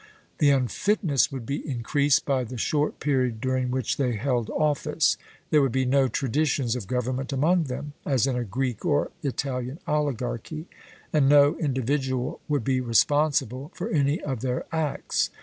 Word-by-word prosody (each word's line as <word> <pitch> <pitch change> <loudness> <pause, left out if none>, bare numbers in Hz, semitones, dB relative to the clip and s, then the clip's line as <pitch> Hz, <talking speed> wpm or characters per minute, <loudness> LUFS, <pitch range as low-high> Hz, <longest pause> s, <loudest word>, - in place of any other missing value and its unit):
The 145 - +5
unfitness 140 - +2
would 130 -4 -6
be 140 +4 -2
increased 140 +2 +1
by 135 -2 +1
the 125 +1 -7
short 150 +6 0
period 130 -6 0
during 130 +1 0
which 130 -2 -1
they 125 -3 +1
held 120 0 -1
office. 150 -2 +1 0.4
There 150 - +5
would 135 -3 +2
be 130 +2 +1
no 135 +1 +3
traditions 135 -2 0
of 115 -7 -5
government 130 +3 -2
among 160 +5 +2
them, 140 +2 -5
as 135 -4 +2
in 135 -2 0
a 125 - -1
Greek 120 +2 -3
or 145 -4 +1
Italian 135 -2 -3
oligarchy, 145 0 -2 0.5
and 145 -3 +4
no 145 +2 +6
individual 130 -2 -1
would 145 -5 0
be 130 +2 +1
responsible 135 +2 +2
for - - -4
any 145 +1 +2
of 130 -6 -4
their 125 -1 -2
acts. 160 -3 -1
135 Hz, 160 wpm, -26 LUFS, 125-145 Hz, 0.5 s, no